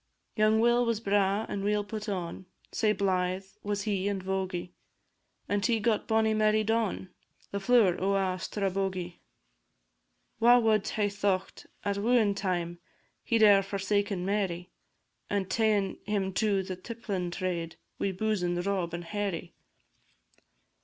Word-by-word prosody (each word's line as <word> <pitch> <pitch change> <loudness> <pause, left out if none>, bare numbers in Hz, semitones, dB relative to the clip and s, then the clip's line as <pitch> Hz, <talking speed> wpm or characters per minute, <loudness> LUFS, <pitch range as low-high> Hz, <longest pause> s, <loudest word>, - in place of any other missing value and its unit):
Young 215 0 +4
Will 240 +1 +4
was 230 -2 0
braw 200 0 +1
and 195 - -4
weel 210 0 +1
put 215 0 -5
on, 185 -1 -4 0.2
Sae 215 -2 +2
blythe 185 -2 0 0.2
was 205 -1 -2
he 200 -2 -1
and 200 -1 -1
vogie; 185 -2 -3 0.8
And 205 -1 0
he 230 0 +2
got 215 0 0
bonnie 220 -1 +3
Mary 215 0 +3
Don, 220 -4 -1 0.4
The 200 - -2
flower 200 -5 +3
o' 195 +1 +2
a' 185 -1 0
Strabogie. 190 -3 -2 1.2
Wha 240 +2 +7
wad 220 -3 +2
hae 210 -2 0
thocht, 200 -2 -2 0.2
at 200 0 0
wooin' 220 -1 +3
time, 175 -3 -2 0.4
He 230 - +1
'd 220 - +4
e'er 200 -2 +7
forsaken 200 -1 -1
Mary, 190 -3 -1 0.6
And 195 -2 -1
ta'en 210 -2 +1
him 195 -2 -1
to 200 0 +1
the 185 0 -5
tipplin' 195 -3 -4
trade, 175 -3 -3 0.2
Wi' 195 - 0
boozin' 185 -3 -1
Rob 180 -2 -1
and 170 - -5
Harry? 185 -2 -3
200 Hz, 140 wpm, -29 LUFS, 185-215 Hz, 1.2 s, Wha